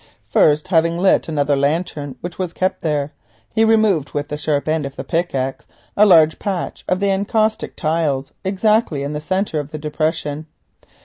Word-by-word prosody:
First, 150 +2 +3
having 165 -1 +2
lit 185 -1 +2
another 145 -2 +1
lantern 145 0 -1
which 175 +1 -7
was 180 -2 -3
kept 185 0 -1
there, 150 -2 -1 0.4
he 220 - +3
removed 215 -9 +2
with 145 0 -3
the 150 - -3
sharp 150 -1 -1
end 155 0 +1
of 140 0 -6
the - - -5
pickaxe 135 -6 -2 0.3
a 210 +1 +6
large 160 -4 +5
patch 190 -4 -4
of 185 +1 +1
the 200 0 +1
encaustic 215 +3 0
tiles 150 -4 -1
exactly 195 -5 +1
in 145 +1 -3
the 150 - -4
centre 185 -1 -1
of 145 0 -5
the 155 - -6
depression. 155 0 -2
160 Hz, 175 wpm, -19 LUFS, 150-185 Hz, 0.4 s, a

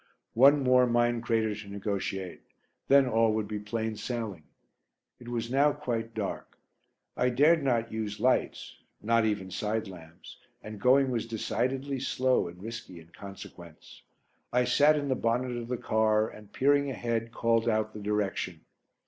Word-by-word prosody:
One 140 +4 +6
more 125 -1 +4
mine 120 0 +1
crater 110 -2 0
to 105 0 -9
negotiate; 95 -2 -4 0.5
then 140 0 +6
all 115 -2 +2
would 110 -1 -2
be 105 0 -4
plain 110 +1 -3
sailing. 110 -6 -5 0.8
It 120 - -13
was 120 -1 -3
now 140 +2 +3
quite 115 -6 -4
dark. 105 -3 -5 0.6
I 125 - +1
dared 150 +6 +4
not 120 -4 0
use 110 -1 -4
lights, 130 - 0 0.2
not, 115 +1 +2
even 100 -3 -2
side 110 +3 -2
lamps, 85 -3 -13 0.3
and 105 -1 -9
going 130 +1 +4
was 115 -2 -2
decidedly 130 +4 -2
slow 130 -5 +1
and 90 +2 -11
risky 110 -6 -8
in 80 0 -17
consequence. 90 -4 -12 0.5
I 125 0 +3
sat 145 +5 +4
in 145 -1 -2
the 135 - +1
bonnet 125 +1 -1
of 120 -1 -5
the 125 0 -2
car 110 -1 +1
and, 105 -2 -13
peering 140 +3 +2
ahead, 115 -3 -3
called 115 0 +1
out 110 -1 0
the 105 - -8
direction. 100 -5 -2
115 Hz, 155 wpm, -29 LUFS, 105-125 Hz, 0.8 s, One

